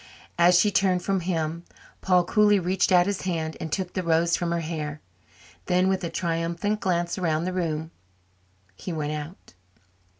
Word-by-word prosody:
As 175 +1 +6
she 210 - +3
turned 185 -2 +2
from 195 -1 0
him, 165 -2 -2 0.4
Paul 180 -1 +3
coolly 210 +3 +4
reached 185 +1 0
out 175 -1 +6
his 200 0 -2
hand 160 -4 -2
and 160 - -5
took 180 +3 -3
the 185 - -1
rose 170 0 +2
from 175 -1 -2
her 170 0 0
hair; 155 -2 -4 0.7
then, 180 +1 +2
with 190 -1 -1
a 170 - -2
triumphant 170 +5 -2
glance 175 -2 -1
around 160 -3 0
the 185 - -2
room, 160 -3 -2 0.8
he 180 - -7
went 150 -2 -3
out. 150 - -8
175 Hz, 170 wpm, -25 LUFS, 165-185 Hz, 0.8 s, As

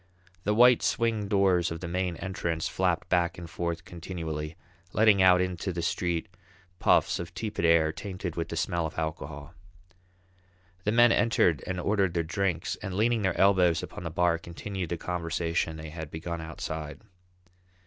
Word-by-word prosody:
The 105 +1 +2
white 125 +1 +6
swing 115 -4 0
doors 95 -3 +3
of 85 - -5
the 85 - -5
main 90 0 -1
entrance 85 -3 -2
flapped - - 0
back 85 -2 +1
and 85 -1 -7
forth 85 +1 -4
continually, 80 -4 -5 0.4
letting 105 -2 +5
out 90 -1 +6
into 90 +1 -2
the 85 -1 -4
street 85 0 -1 0.5
puffs - - +3
of 85 +1 -7
tepid 105 -3 -2
air 80 -1 +4
tainted 90 -3 -5
with 85 0 -3
the 85 - -4
smell 85 0 0
of 80 - -11
alcohol. 80 -1 -5 1.3
The 105 - +2
men 120 +1 +6
entered 115 - +3
and 95 -1 -2
ordered 95 -2 +1
their 85 - +1
drinks, 90 0 -1
and 95 -2 -6
leaning 115 +2 +2
their 95 -3 0
elbows 95 -4 +4
upon - - -7
the 85 - -3
bar 85 0 +1
continued 90 +1 -6
the 85 - -2
conversation 85 -1 -2
they 80 0 -8
had 80 -2 -7
begun 80 +1 -5
outside. 80 +1 -6
85 Hz, 165 wpm, -28 LUFS, 80-95 Hz, 1.3 s, white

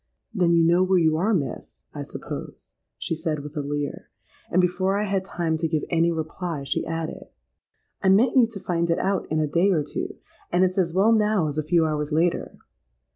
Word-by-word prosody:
'—'Then 175 -5 +3
you 165 - +4
know 170 +2 +4
where 185 0 +3
you 160 -2 +3
are, 190 +8 +1
Miss, 140 - -3
I - - -5
suppose?' - - -8 0.3
she - - -3
said, 160 -2 -2
with 150 +1 -9
a - - -2
leer; 145 0 -4 0.4
and, 180 - +2
before 185 +2 +1
I 210 - 0
had 195 -2 -1
time 170 -4 -2
to 165 +1 -1
give 155 -2 -1
any 170 0 +3
reply, 160 -1 -4
she 140 - -1
added, 165 0 -4 0.7
'I 190 - +3
meant 225 +8 +4
you 250 -3 +6
to 225 -3 -8
find 170 -2 -1
it 170 - +2
out 195 -1 -1
in 155 - 0
a 155 - +2
day 170 +6 +2
or 165 -6 +2
two; 145 - -5 0.4
and 175 +1 +3
it's 185 +1 +1
as 175 -3 +1
well 195 +6 +3
now 210 -6 +2
as 145 +1 -3
a - - -1
few 165 +1 +2
hours 150 -1 -2
later. 165 +3 0
170 Hz, 215 wpm, -24 LUFS, 155-190 Hz, 0.7 s, you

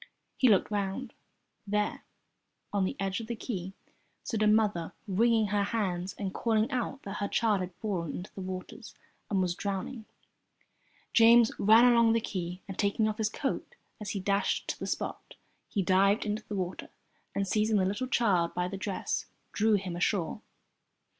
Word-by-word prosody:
He 255 - +4
looked 205 0 +3
round. 205 +5 -2 0.5
There, 210 +1 -1 0.7
on 200 -2 +2
the - - -2
edge 195 0 -1
of 225 - -7
the 235 - -3
quay, 190 -5 -5 0.5
stood 220 -3 -2
a 215 - +4
mother 210 -6 +2
wringing 220 +2 +3
her 205 0 +1
hands 190 -4 -2
and 195 -2 -3
calling 225 +2 +1
out 255 +2 -2
that 200 0 -5
her 200 - -1
child 210 -2 +2
had 180 -1 -5
fallen 180 -7 -3
into 180 - -7
the 195 - -7
water 185 0 -6 0.5
and 195 - +1
was 180 -1 0
drowning. 200 +5 -4 1.1
James 230 0 +7
ran 220 +4 +7
along 235 -2 +5
the 230 - +3
quay, 180 -4 -4
and 195 - -8
taking 205 +1 +2
off 215 +1 -3
his 215 -1 +1
coat 270 +5 -3 0.2
as 210 -2 -5
he - - -1
dashed 200 +1 0
to - - -3
the - - -4
spot, - - -4 0.3
he 200 - 0
dived 195 +4 +3
into 210 +1 -2
the 210 - -4
water 185 -1 -4 0.5
and, 200 0 0
seizing 215 +2 +2
the 190 - +2
little 205 +7 -1
child 195 -9 +2
by 180 0 0
the 195 +2 -5
dress, 190 0 -3 0.2
drew 215 0 +3
him 185 -3 -2
ashore. 180 +2 0
205 Hz, 175 wpm, -30 LUFS, 190-220 Hz, 1.1 s, James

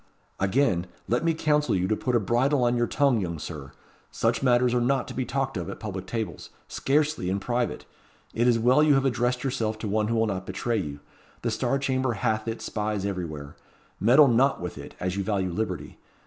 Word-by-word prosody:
"Again, 95 -3 +1 0.2
let 120 +7 +1
me 165 -1 +2
counsel 150 -4 +2
you 90 0 +1
to 110 - +1
put 125 +3 -1
a - - +5
bridle 125 +6 +2
on 120 0 +2
your 120 0 +1
tongue, 140 -6 +2
young 85 -3 -3
Sir. 75 -3 -7 0.4
Such - - 0
matters 125 -1 +3
are 125 - +2
not 130 +2 +1
to - - -7
be 130 - -2
talked 135 -2 -2
of 85 -3 -4
at - - -7
public 95 -4 -6
tables 115 -2 -4 0.2
scarcely 145 -8 0
in 95 +2 0
private. 120 +4 -2 0.5
It 120 +2 +2
is 120 -2 +4
well 125 +6 +4
you 150 -2 +5
have 135 0 +2
addressed 125 0 0
yourself 110 -5 -1
to 110 - -5
one 105 +1 +1
who 115 - 0
will 115 0 +3
not 95 -3 -3
betray 115 +5 -1
you. 70 -5 -4 0.4
The - - 0
Star 135 - 0
Chamber 130 -2 0
hath 110 0 -1
its 115 0 -4
spies 105 -2 -2
everywhere. 80 -7 -5 0.4
Meddle 130 +8 +6
not 130 +3 +3
with 90 0 -5
it, 70 - -10
as 90 +1 -2
you - - 0
value 95 -3 -1
liberty. 110 +5 -4
115 Hz, 210 wpm, -26 LUFS, 95-130 Hz, 0.5 s, Meddle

